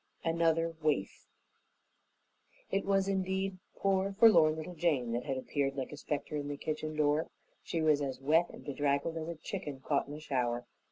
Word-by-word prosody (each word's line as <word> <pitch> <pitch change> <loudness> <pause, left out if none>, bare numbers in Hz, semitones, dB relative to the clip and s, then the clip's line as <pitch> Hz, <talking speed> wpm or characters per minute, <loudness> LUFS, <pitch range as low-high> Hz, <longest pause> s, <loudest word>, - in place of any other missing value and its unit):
Another 165 0 +2
Waif 150 -11 -1 1.4
It 195 - 0
was 195 -1 +2
indeed 190 0 -1 0.2
poor, 195 0 +1
forlorn 170 -9 +7
little 160 +3 -6
Jane 150 -8 +1
that 120 +1 -2
had 135 - -1
appeared 135 +1 -1
like 135 -2 -4
a - - -6
specter 150 0 -3
in 145 -1 -3
the 145 0 -4
kitchen 155 +1 -3
door. 150 +1 +2 0.3
She 165 -1 -2
was 150 -2 +4
as 135 -2 -3
wet 160 +5 +3
and - - -12
bedraggled 145 +3 0
as 160 -1 -4
a 170 - -4
chicken 155 -4 -5
caught 140 +1 0
in 145 - -6
a - - -7
shower. 125 -5 -1
155 Hz, 175 wpm, -32 LUFS, 140-170 Hz, 1.4 s, forlorn